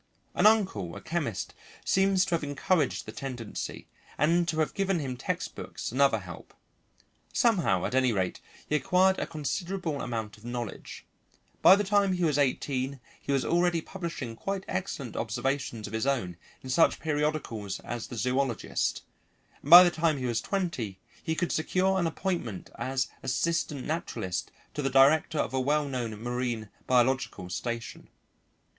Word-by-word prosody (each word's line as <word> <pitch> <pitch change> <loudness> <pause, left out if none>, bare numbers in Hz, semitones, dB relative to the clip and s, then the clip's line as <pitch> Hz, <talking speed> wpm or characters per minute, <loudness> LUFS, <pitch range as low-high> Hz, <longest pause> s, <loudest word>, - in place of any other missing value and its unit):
An - - +5
uncle, 185 - +2
a - - -6
chemist, 145 - -3 0.3
seems 190 0 +3
to 175 - -3
have 165 - +1
encouraged 145 +1 0
the - - -7
tendency, 125 -5 -6 0.3
and 170 +3 +3
to 160 - -1
have 155 - +1
given 195 -2 +1
him 135 -5 -3
textbooks 125 - -4
and 130 +4 0
other 135 -5 +5
help. 90 -4 -10 0.8
Somehow 175 - +2
at - - -3
any 130 -1 +3
rate 95 -4 -1 0.3
he 150 - 0
acquired 185 +6 +3
a - - -2
considerable 160 +1 -3
amount 110 -4 -4
of - - -21
knowledge; 120 -2 -6 0.6
by 190 - +9
the 205 - 0
time 200 -1 +3
he 180 -1 -1
was 150 -3 +2
eighteen 135 0 0 0.2
he - - -3
was 135 -1 +1
already 175 0 +2
publishing 165 -10 -6
quite 195 +9 -4
excellent 180 - -4
observations 120 0 -2
of 105 - -8
his 110 +4 -1
own 115 -11 0 0.3
in 130 - -5
such 165 +6 +4
periodicals 150 -10 -2
as 120 -1 -5
the 120 - -7
Zoologist, 125 +1 0 0.6
and 145 - -8
by 175 +2 +12
the 175 - +3
time 160 -2 +1
he 130 - -3
was 120 -2 0
twenty 150 - -2 0.2
he 160 -1 -2
could 175 +1 -1
secure 190 +4 +1
an 170 - +1
appointment 160 - -3
as 130 0 0
assistant 145 +1 -1
naturalist 95 - -3 0.2
to 150 - -3
the 135 - 0
director 140 +4 +4
of - - -1
a 130 - +1
well 150 +3 +2
known 120 -5 -3
marine 120 -2 -3 0.2
biological 125 -7 +1
station. 115 +5 -4
140 Hz, 160 wpm, -28 LUFS, 120-170 Hz, 0.8 s, by